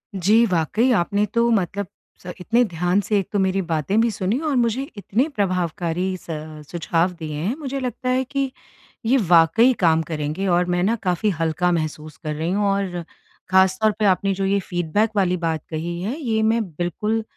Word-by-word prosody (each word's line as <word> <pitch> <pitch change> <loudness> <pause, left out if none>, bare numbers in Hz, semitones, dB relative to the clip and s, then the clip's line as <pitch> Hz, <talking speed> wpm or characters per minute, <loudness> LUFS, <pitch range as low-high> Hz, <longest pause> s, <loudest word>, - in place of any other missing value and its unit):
जी, 210 +6 +4
वाक़ई 205 - +1
आपने 200 +4 +1
तो 235 0 +3
मतलब 200 -2 0 0.4
स 180 - -6
इतने 230 +7 +2
ध्यान 180 0 0
से 205 +2 0
एक 195 - -4
तो 205 - 0
मेरी 190 0 +1
बातें 165 +4 0
भी 230 - +2
सुनी 200 +5 -1
और 280 - 0
मुझे 240 0 +1 0.2
इतने 225 +7 0
प्रभावकारी 180 -1 -1
स - - -20 0.5
सुझाव 170 +1 0
दिए 155 -2 -5
हैं 185 - -2
मुझे 275 -2 -4
लगता 255 0 -3
है 255 +1 +2
कि 270 0 -2 0.5
ये 255 +4 +4
वाक़ई 180 +9 +5
काम 165 -3 +4
करेंगे 155 +4 -3
और 180 0 +3
मैं 175 - +1
न 225 +4 +2
काफ़ी 180 +3 +1
हल्का 165 +2 +1
महसूस 155 -2 -3
कर 155 0 -2
रही 160 +3 -2
हूँ 205 +2 +1
और 195 -3 -1 0.5
ख़ासतौर 190 +3 +4
पे 215 - +2
आपने 195 0 +2
जो 195 +1 -2
ये 200 +1 +2
फ़ीडबैक 175 +4 0
वाली 180 -3 +2
बात 165 -2 -2
कही 170 +2 -4
है 220 +10 -3
ये 225 -7 0
मैं 225 +1 +2
बिल्कुल 180 +7 -2
190 Hz, 185 wpm, -22 LUFS, 170-220 Hz, 0.5 s, वाक़ई